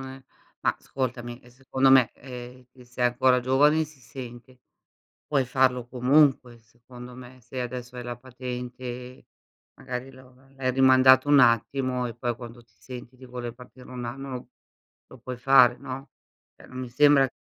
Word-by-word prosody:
ne 130 Hz, 0 st, -10 dB, 0.4 s
ma -, -, 0 dB
ascoltami, 120 Hz, -2 st, -5 dB
ehm, 125 Hz, -, -19 dB
secondo 130 Hz, +1 st, +1 dB
me, 130 Hz, -3 st, +6 dB
ehm, 125 Hz, -1 st, -10 dB
che 125 Hz, -2 st, -17 dB
sei 125 Hz, 0 st, -1 dB
ancora 125 Hz, +1 st, +3 dB
giovani 145 Hz, +5 st, +3 dB
si 150 Hz, -3 st, -17 dB
sente, 125 Hz, 0 st, -11 dB, 0.7 s
puoi 140 Hz, -3 st, +1 dB
farlo 125 Hz, -1 st, +1 dB
comunque, 130 Hz, -1 st, +2 dB
secondo 125 Hz, +2 st, -14 dB
me. 130 Hz, 0 st, -13 dB
Se 125 Hz, +2 st, -7 dB
adesso 125 Hz, 0 st, -6 dB
hai 125 Hz, -, -6 dB
la 120 Hz, 0 st, -5 dB
patente, 125 Hz, 0 st, -8 dB, 0.5 s
magari 130 Hz, +1 st, -6 dB
lo 130 Hz, -1 st, -17 dB, 0.2 s
l'hai 130 Hz, -1 st, -1 dB
rimandato 130 Hz, +1 st, +5 dB
un 145 Hz, -2 st, +7 dB
attimo 125 Hz, +1 st, +2 dB
e 115 Hz, -, -6 dB
poi 120 Hz, -1 st, -3 dB
quando 120 Hz, 0 st, -11 dB
ti 115 Hz, -2 st, -33 dB
senti 125 Hz, 0 st, -10 dB
di 130 Hz, -, -14 dB
voler 120 Hz, -2 st, -7 dB
partire 125 Hz, +1 st, -15 dB
1 125 Hz, -1 st, -6 dB
anno, 130 Hz, +1 st, -6 dB, 0.6 s
lo 130 Hz, -, -14 dB
puoi 125 Hz, +1 st, -7 dB
fare, 125 Hz, -1 st, +5 dB
no? 135 Hz, +1 st, -8 dB, 0.5 s
Ehm, -, -, -17 dB
non 130 Hz, -, -9 dB
mi 130 Hz, -1 st, -5 dB
sembra 140 Hz, +1 st, +5 dB
125 Hz, 160 wpm, -26 LUFS, 120-130 Hz, 0.7 s, un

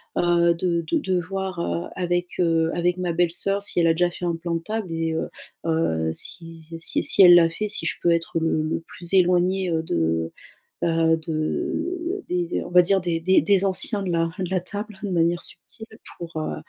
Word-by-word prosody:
bah, 175 Hz, 0 st, +2 dB
heu, 170 Hz, 0 st, +4 dB
de 170 Hz, -1 st, -1 dB
de -, -, +3 dB
de 185 Hz, -1 st, 0 dB
voir, 190 Hz, 0 st, -4 dB
heu, 170 Hz, 0 st, -2 dB
avec, 175 Hz, 0 st, -1 dB
heu, 165 Hz, -2 st, +2 dB
avec 175 Hz, +1 st, 0 dB
ma 180 Hz, -2 st, -2 dB
belle-sœur 175 Hz, +4 st, 0 dB
si 200 Hz, -, +1 dB
elle 165 Hz, -, +4 dB
a 165 Hz, -, +4 dB
déjà 175 Hz, +2 st, +2 dB
fait 175 Hz, +1 st, -7 dB
un 170 Hz, -1 st, 0 dB
plan 170 Hz, +1 st, -3 dB
de 165 Hz, -, -2 dB
table 215 Hz, -2 st, -4 dB
et 165 Hz, 0 st, -1 dB
heu 160 Hz, -, -2 dB, 0.4 s
heu, 120 Hz, -, 0 dB
si 165 Hz, -, -7 dB
si 165 Hz, -, 0 dB
si -, -, +4 dB
elle 175 Hz, -2 st, +10 dB
l'a 170 Hz, -1 st, +6 dB
fait, 210 Hz, +6 st, -3 dB
si 165 Hz, -, -3 dB
je -, -, -1 dB
peux 175 Hz, -, +4 dB
être, 165 Hz, 0 st, -1 dB
heu, -, -, 0 dB
le 160 Hz, -1 st, +1 dB
le 155 Hz, -, -2 dB
plus 175 Hz, +1 st, -8 dB
éloignée, 185 Hz, 0 st, +3 dB
heu, 160 Hz, -1 st, 0 dB
de 80 Hz, -, -1 dB, 0.5 s
bah 165 Hz, -1 st, +3 dB
de 345 Hz, -, -3 dB
des 180 Hz, -1 st, 0 dB
d -, -, -3 dB
on -, -, -9 dB
va 180 Hz, 0 st, +6 dB
dire 190 Hz, +2 st, +2 dB
des 170 Hz, -2 st, -1 dB
des 190 Hz, +3 st, +3 dB
anciens 195 Hz, +2 st, +1 dB
de 185 Hz, -, -2 dB
la 165 Hz, 0 st, +1 dB
de 185 Hz, -2 st, -3 dB
la 190 Hz, -, +2 dB
table 205 Hz, +3 st, -7 dB
de 205 Hz, -, -2 dB
manière 170 Hz, -1 st, +1 dB
subtile. -, -, -13 dB, 0.5 s
Pour, 170 Hz, -1 st, -7 dB
heu, 155 Hz, -, -3 dB
175 Hz, 220 wpm, -23 LUFS, 165-185 Hz, 0.5 s, elle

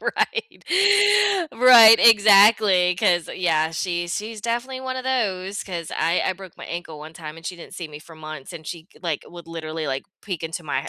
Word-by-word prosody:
Right. 455 Hz, -2 st, -3 dB, 0.9 s
Right, 230 Hz, -2 st, +8 dB
exactly, 205 Hz, -4 st, +5 dB
'cause, 175 Hz, -1 st, 0 dB
yeah, 160 Hz, -3 st, 0 dB
she 175 Hz, 0 st, -4 dB
she's 215 Hz, +4 st, -6 dB
definitely 240 Hz, +4 st, -4 dB
one 260 Hz, 0 st, -5 dB
of 255 Hz, -, -6 dB
those 200 Hz, -7 st, -2 dB
'cause 170 Hz, -4 st, -7 dB
I 165 Hz, +3 st, 0 dB
I -, -, 0 dB
broke 185 Hz, -1 st, -14 dB
my -, -, -10 dB
ankle 165 Hz, -3 st, -8 dB
one 155 Hz, +1 st, -11 dB
time, 160 Hz, -2 st, -10 dB
and 165 Hz, +1 st, -11 dB
she 180 Hz, -, -6 dB
didn't 170 Hz, -, -13 dB
see 170 Hz, -3 st, -7 dB
me 150 Hz, 0 st, -11 dB
for 165 Hz, +1 st, -16 dB
months, 155 Hz, -1 st, -10 dB
and 160 Hz, -2 st, -11 dB
she 165 Hz, -1 st, -8 dB
c -, -, -21 dB
like, 165 Hz, -4 st, -3 dB
would 170 Hz, -1 st, -13 dB
literally, 160 Hz, -1 st, -6 dB
like, 135 Hz, -1 st, -4 dB, 0.2 s
peek 185 Hz, -6 st, -6 dB
into 165 Hz, +2 st, -6 dB
my 140 Hz, -3 st, -3 dB
h -, -, -8 dB
175 Hz, 205 wpm, -21 LUFS, 160-215 Hz, 0.9 s, Right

